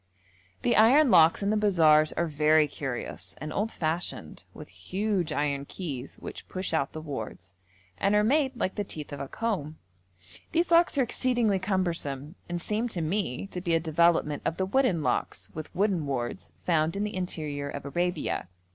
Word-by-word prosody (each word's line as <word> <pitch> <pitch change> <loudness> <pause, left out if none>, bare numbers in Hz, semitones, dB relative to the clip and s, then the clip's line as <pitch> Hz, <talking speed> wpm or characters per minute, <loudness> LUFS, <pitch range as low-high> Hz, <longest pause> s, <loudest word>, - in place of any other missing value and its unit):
The 240 - +3
iron 255 +5 +6
locks 165 +4 +6
in 200 - +1
the - - +2
bazaars 160 -7 +4
are 170 - 0
very 155 0 +3
curious 135 -4 -6
and 155 +2 -5
old 215 +3 -1
fashioned, 165 +2 -3
with - - -11
huge 180 - -2
iron 140 -1 -1
keys 140 -7 -6
which - - -9
push 185 -1 -2
out 145 -3 0
the 155 - -5
wards, 110 - -7 0.5
and 200 +1 +2
are 210 - +4
made 270 +3 +2
like 185 - 0
the 205 - -2
teeth 150 -6 -6
of 140 - -6
a 140 - -4
comb. 170 -9 -3 0.8
These 340 +1 +1
locks 335 -3 +5
are 270 - +4
exceedingly 240 -4 +1
cumbersome, 170 -7 -1 0.2
and 175 0 -2
seem 215 +6 -1
to 185 -7 -3
me 165 -3 -1
to 180 - -4
be 170 -2 +1
a - - +3
development 160 -2 +2
of 165 - -1
the 190 - 0
wooden 195 - +2
locks - - -2
with 155 -1 -6
wooden 185 -5 +1
wards 130 +5 -4
found 160 -1 +2
in 200 - -1
the 210 -1 -3
interior 150 -6 -3
of 140 0 -6
Arabia. 175 - -1
170 Hz, 180 wpm, -28 LUFS, 150-205 Hz, 0.8 s, iron